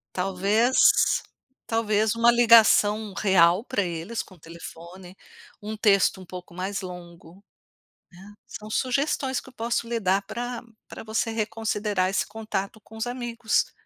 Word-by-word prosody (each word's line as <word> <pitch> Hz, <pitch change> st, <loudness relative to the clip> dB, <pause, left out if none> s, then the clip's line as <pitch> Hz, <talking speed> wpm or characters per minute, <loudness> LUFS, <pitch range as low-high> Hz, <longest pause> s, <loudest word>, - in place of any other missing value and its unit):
Talvez 195 Hz, +7 st, +1 dB, 0.9 s
talvez 220 Hz, -1 st, +1 dB
uma 235 Hz, +1 st, +5 dB
ligação 220 Hz, -3 st, +5 dB
real 185 Hz, -2 st, +3 dB
para 245 Hz, -4 st, -2 dB
eles 175 Hz, +5 st, -4 dB
com 185 Hz, -, -17 dB
o -, -, -24 dB
telefone, 170 Hz, +3 st, -11 dB, 0.5 s
um 215 Hz, +1 st, -5 dB
texto 200 Hz, -2 st, +3 dB
um 185 Hz, -, -11 dB
pouco 180 Hz, -1 st, -10 dB
mais 190 Hz, +2 st, -4 dB
longo, 180 Hz, 0 st, -11 dB, 0.8 s
né. 205 Hz, -, -13 dB
São 215 Hz, 0 st, -10 dB
sugestões 265 Hz, +2 st, -1 dB
que -, -, -10 dB
eu -, -, -23 dB
posso 235 Hz, 0 st, -2 dB
lhe 235 Hz, 0 st, -2 dB
dar 195 Hz, 0 st, +1 dB
pra 245 Hz, +3 st, -6 dB, 0.3 s
pra -, -, -9 dB
você 220 Hz, +1 st, -1 dB
reconsiderar 210 Hz, -3 st, -1 dB
esse 195 Hz, -, -1 dB
contato 215 Hz, -1 st, -5 dB
com 220 Hz, -, -15 dB
os 220 Hz, +2 st, -3 dB
amigos. 240 Hz, -2 st, -1 dB
210 Hz, 145 wpm, -25 LUFS, 185-230 Hz, 0.9 s, uma